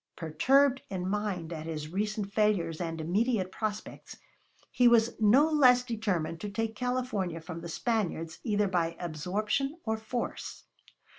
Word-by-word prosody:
Perturbed 265 Hz, -, +3 dB
in 185 Hz, -2 st, -3 dB
mind 190 Hz, -5 st, -2 dB
at 160 Hz, 0 st, -6 dB
his 155 Hz, -2 st, -4 dB
recent 205 Hz, +2 st, -2 dB
failures 185 Hz, -7 st, +1 dB
and 165 Hz, -1 st, -3 dB
immediate 190 Hz, +4 st, 0 dB
prospects, 215 Hz, +1 st, -5 dB, 0.5 s
he 245 Hz, -, +4 dB
was 235 Hz, -1 st, +5 dB
no 235 Hz, +8 st, +5 dB
less 255 Hz, -5 st, +5 dB
determined 200 Hz, -9 st, -2 dB
to 210 Hz, -, -4 dB
take 220 Hz, +2 st, -2 dB
California 245 Hz, -8 st, -2 dB
from 165 Hz, 0 st, -8 dB
the 170 Hz, -, -7 dB
Spaniards 170 Hz, -6 st, -2 dB
either 210 Hz, -3 st, +1 dB
by 170 Hz, -3 st, 0 dB
absorption 210 Hz, -, -2 dB
or 220 Hz, -1 st, -1 dB
force. 235 Hz, +2 st, -5 dB
210 Hz, 140 wpm, -30 LUFS, 170-235 Hz, 0.5 s, was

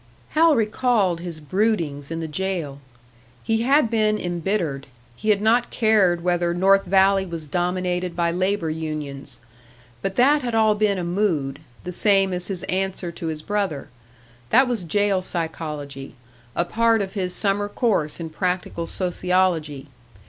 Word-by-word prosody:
Hal 320 Hz, 0 st, +4 dB
recalled 215 Hz, -5 st, +1 dB
his 170 Hz, -2 st, -7 dB
broodings 160 Hz, -5 st, -1 dB
in 165 Hz, 0 st, -4 dB
the 160 Hz, -, -3 dB
jail. 160 Hz, -4 st, -3 dB, 0.6 s
He 225 Hz, 0 st, +1 dB
had 265 Hz, -1 st, +3 dB
been 215 Hz, -2 st, +2 dB
embittered; 175 Hz, -6 st, -2 dB, 0.3 s
he 215 Hz, -, -3 dB
had 205 Hz, -1 st, +3 dB
not 235 Hz, +3 st, +3 dB
cared 200 Hz, -7 st, +2 dB
whether 175 Hz, -1 st, +1 dB
North 195 Hz, +2 st, +4 dB
Valley 195 Hz, +1 st, +4 dB
was 170 Hz, -4 st, -6 dB
dominated 180 Hz, +2 st, -1 dB
by 170 Hz, -1 st, +1 dB
labour 185 Hz, -1 st, 0 dB
unions. 145 Hz, -5 st, -5 dB, 0.6 s
But 195 Hz, 0 st, -3 dB
that 285 Hz, +4 st, +4 dB
had 240 Hz, -3 st, -2 dB
all 220 Hz, -1 st, +4 dB
been 210 Hz, -1 st, +1 dB
a 180 Hz, -, -2 dB
mood, 170 Hz, -7 st, -1 dB, 0.2 s
the 180 Hz, -, -5 dB
same 195 Hz, 0 st, +3 dB
as 180 Hz, 0 st, -3 dB
his 190 Hz, -3 st, -3 dB
answer 190 Hz, -1 st, -2 dB
to 165 Hz, 0 st, -6 dB
his 155 Hz, -1 st, -3 dB
brother; 200 Hz, -9 st, -2 dB, 0.6 s
that 260 Hz, +2 st, +5 dB
was 230 Hz, -7 st, -2 dB
jail 205 Hz, +2 st, +1 dB
psychology, 150 Hz, -6 st, -5 dB, 0.4 s
a 170 Hz, -, +1 dB
part 230 Hz, +2 st, +2 dB
of 190 Hz, -, -7 dB
his 185 Hz, -3 st, -2 dB
summer 205 Hz, +1 st, 0 dB
course 200 Hz, -10 st, 0 dB
in 165 Hz, -1 st, -6 dB
practical 180 Hz, -1 st, -2 dB
sociology. 180 Hz, -5 st, 0 dB
185 Hz, 150 wpm, -23 LUFS, 165-210 Hz, 0.6 s, that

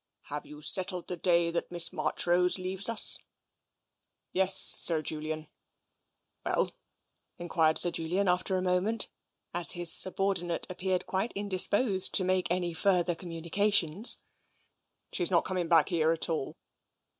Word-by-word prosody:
" -, -, -55 dB
Have 150 Hz, -, -6 dB
you 150 Hz, 0 st, -13 dB
settled 185 Hz, +2 st, +2 dB
the 180 Hz, -, -5 dB
day 170 Hz, -1 st, 0 dB
that 170 Hz, -, -4 dB
Miss 175 Hz, 0 st, +2 dB
Marchrose 180 Hz, +1 st, 0 dB
leaves 185 Hz, +3 st, -1 dB
us? 230 Hz, -, +1 dB, 0.4 s
" -, -, -53 dB
" -, -, -53 dB
Yes, 190 Hz, 0 st, +4 dB
Sir 160 Hz, -2 st, 0 dB
Julian." 155 Hz, 0 st, -6 dB, 1.0 s
"Well?" -, -, -1 dB, 0.7 s
enquired 165 Hz, -2 st, 0 dB
Sir 175 Hz, -, +6 dB
Julian, 175 Hz, +5 st, -2 dB
after 185 Hz, +1 st, 0 dB
a 185 Hz, -, -3 dB
moment, 185 Hz, +5 st, 0 dB, 0.4 s
as 175 Hz, 0 st, +4 dB
his 175 Hz, -1 st, +2 dB
subordinate 185 Hz, -3 st, 0 dB
appeared 185 Hz, 0 st, -3 dB
quite 195 Hz, +5 st, -3 dB
indisposed 200 Hz, +1 st, +2 dB
to 190 Hz, -, +5 dB
make 185 Hz, 0 st, -1 dB
any 175 Hz, -1 st, -2 dB
further 180 Hz, 0 st, +1 dB
communications. 175 Hz, +3 st, +1 dB, 0.9 s
She's 175 Hz, -, -1 dB
not 175 Hz, -3 st, +1 dB
coming 180 Hz, -2 st, -3 dB
back 165 Hz, 0 st, +3 dB
here 165 Hz, -3 st, 0 dB
at 165 Hz, -, -1 dB
all." 160 Hz, -4 st, -4 dB
180 Hz, 145 wpm, -28 LUFS, 170-190 Hz, 1.0 s, Sir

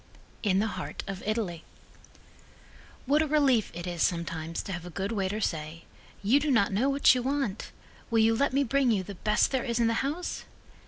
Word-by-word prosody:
In 195 Hz, -3 st, +2 dB
the 205 Hz, -, +2 dB
Heart 220 Hz, -, -5 dB
of 195 Hz, -1 st, -6 dB
Italy 205 Hz, -7 st, -2 dB, 1.4 s
What 290 Hz, +4 st, +3 dB
a 315 Hz, -, +1 dB
relief 275 Hz, -8 st, +3 dB
it 175 Hz, 0 st, -5 dB
is 175 Hz, -2 st, -4 dB
sometimes 170 Hz, -1 st, -1 dB
to -, -, -6 dB
have 175 Hz, -2 st, -5 dB
a 180 Hz, -, -8 dB
good 195 Hz, +4 st, -3 dB
waiter 200 Hz, -1 st, -1 dB
say: 160 Hz, -4 st, -3 dB, 0.4 s
"You 235 Hz, +8 st, +4 dB
do 295 Hz, +1 st, -1 dB
not 205 Hz, -7 st, +3 dB
know 245 Hz, +8 st, +2 dB
what 280 Hz, 0 st, +5 dB
you 250 Hz, -, -1 dB
want? 260 Hz, -6 st, -2 dB, 0.4 s
Will 230 Hz, -, +1 dB
you 225 Hz, 0 st, +4 dB
let 280 Hz, +4 st, +1 dB
me 275 Hz, +2 st, +2 dB
bring 275 Hz, 0 st, +2 dB
you 205 Hz, -5 st, +2 dB
the 200 Hz, -, -8 dB
best 210 Hz, +3 st, +1 dB
there 260 Hz, -2 st, 0 dB
is 235 Hz, -2 st, -1 dB
in 235 Hz, -, +3 dB
the 230 Hz, -, +2 dB
house?" 305 Hz, +6 st, -3 dB
220 Hz, 205 wpm, -28 LUFS, 185-270 Hz, 1.4 s, what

